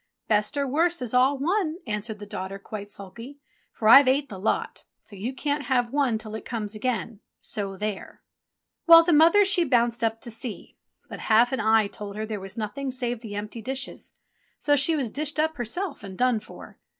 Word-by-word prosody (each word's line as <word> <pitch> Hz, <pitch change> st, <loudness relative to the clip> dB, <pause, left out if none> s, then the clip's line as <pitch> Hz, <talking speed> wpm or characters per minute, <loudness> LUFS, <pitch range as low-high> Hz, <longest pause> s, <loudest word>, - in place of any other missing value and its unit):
"Best 210 Hz, +6 st, +1 dB
or 280 Hz, -, +1 dB
worst 325 Hz, +2 st, +1 dB
is 245 Hz, -, -5 dB
all 260 Hz, +3 st, +4 dB
one," 330 Hz, +3 st, 0 dB
answered 215 Hz, -1 st, -4 dB
the 205 Hz, -, -9 dB
daughter 195 Hz, -1 st, -6 dB
quite 205 Hz, 0 st, -8 dB
sulky, 230 Hz, +8 st, -10 dB, 0.3 s
"for 215 Hz, -, -2 dB
I've 270 Hz, +4 st, +9 dB
ate 280 Hz, +2 st, +2 dB
the 195 Hz, -, -8 dB
lot, 205 Hz, -, -2 dB, 0.2 s
so 205 Hz, -, -12 dB
you 210 Hz, +6 st, -4 dB
can't 285 Hz, +2 st, -2 dB
have 245 Hz, -1 st, 0 dB
one 275 Hz, -6 st, +2 dB
till 215 Hz, -1 st, -9 dB
it 220 Hz, -, -6 dB
comes 215 Hz, -3 st, -4 dB
again 225 Hz, -1 st, -3 dB
— -, -, -61 dB
so 195 Hz, -2 st, -4 dB
there 210 Hz, -1 st, -5 dB, 0.3 s
!" -, -, -57 dB
Well, 330 Hz, 0 st, +10 dB
the 340 Hz, 0 st, +2 dB
mother 335 Hz, +7 st, +6 dB
she 390 Hz, -3 st, +4 dB
bounced 240 Hz, -5 st, +1 dB
up 225 Hz, 0 st, 0 dB
to 235 Hz, -, -7 dB
see; 225 Hz, 0 st, -6 dB, 0.3 s
but -, -, -8 dB
half 230 Hz, +2 st, +3 dB
an 265 Hz, -, -1 dB
eye 220 Hz, 0 st, +4 dB
told 200 Hz, 0 st, -8 dB
her 215 Hz, +1 st, -3 dB
there 215 Hz, -1 st, -5 dB
was 195 Hz, +3 st, -9 dB
nothing 225 Hz, +6 st, -4 dB
save 245 Hz, -2 st, -3 dB
the 215 Hz, -4 st, -7 dB
empty 210 Hz, +3 st, -6 dB
dishes; 265 Hz, +4 st, -6 dB, 0.4 s
so 290 Hz, -, +2 dB
she 290 Hz, +4 st, +3 dB
was 265 Hz, -7 st, -2 dB
dished 305 Hz, +1 st, -3 dB
up 315 Hz, 0 st, 0 dB
herself 280 Hz, -, -4 dB
and 190 Hz, -2 st, -9 dB
done 250 Hz, -3 st, +2 dB
for. -, -, -13 dB
235 Hz, 210 wpm, -25 LUFS, 215-280 Hz, 0.4 s, Well